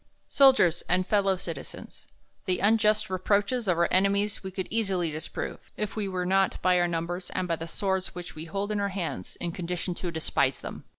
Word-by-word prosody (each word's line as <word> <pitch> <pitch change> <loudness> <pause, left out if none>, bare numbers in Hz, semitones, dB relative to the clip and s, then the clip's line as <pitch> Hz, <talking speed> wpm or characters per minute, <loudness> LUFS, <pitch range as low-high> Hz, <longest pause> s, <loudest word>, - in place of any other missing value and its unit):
Soldiers 260 - +5
and 185 +1 +2
Fellow 195 -2 +2
Citizens, 165 -6 -8 0.4
THE 185 -1 +1
unjust 215 0 +3
reproaches 200 +5 +1
of 180 -3 +2
our 170 - +3
enemies 200 +2 +2
we 190 - -4
could 190 0 -4
easily 190 -7 0
disprove, 155 +1 -6
if 210 -1 -3
we 210 -2 -2
were 185 -1 -2
not, 195 +1 +2
by 180 -1 +4
our 175 - +3
numbers, 175 +2 -3
and 185 - 0
by 165 -1 0
the 165 - -6
swords 190 +1 -2
which 175 -1 -7
we 155 +1 -7
hold 200 +5 -3
in 210 - 0
our 200 0 0
hands, 175 - -4
in 175 - -4
con 170 0 -6
dition 180 0 -2
to 180 - -3
despise 150 -4 +1
them. - - -8
185 Hz, 200 wpm, -28 LUFS, 175-200 Hz, 0.4 s, Soldiers